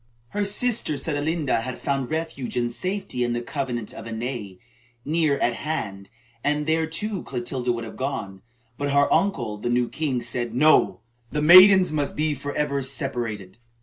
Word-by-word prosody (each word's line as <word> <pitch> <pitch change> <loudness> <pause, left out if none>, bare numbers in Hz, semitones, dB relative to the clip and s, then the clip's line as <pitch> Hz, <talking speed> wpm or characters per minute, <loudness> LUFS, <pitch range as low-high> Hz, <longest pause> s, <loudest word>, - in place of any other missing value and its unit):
Her 205 - -1
sister, 205 -6 +1
Sedelenda, 145 -2 0
had 125 +1 -5
found 135 -3 -2
refuge 155 -6 -4
and 120 -1 0
safety 185 - -3
in 120 0 0
the 120 - -2
convent 120 -5 -4
of - - -9
Ainay, 115 -4 -5 0.5
near 155 -2 +1
at 120 - +1
hand, 100 -11 -4 0.3
and 150 +1 0
there, 160 +1 +1
too, 190 +5 -3
Clotilda 125 0 -3
would 120 -1 -3
have 110 - -9
gone, 115 -8 -4 0.4
but 145 0 -1
her 140 0 +4
uncle, 120 - 0
the 115 +4 -3
new 120 0 +2
king, 135 -5 -2
said: 120 0 -3
"No, 155 -2 +4 0.3
the 150 0 -2
maidens 185 +2 +8
must 145 -2 -1
be 155 0 +1
forever 145 0 -2
separated." 120 -7 -3
140 Hz, 160 wpm, -24 LUFS, 120-155 Hz, 0.5 s, maidens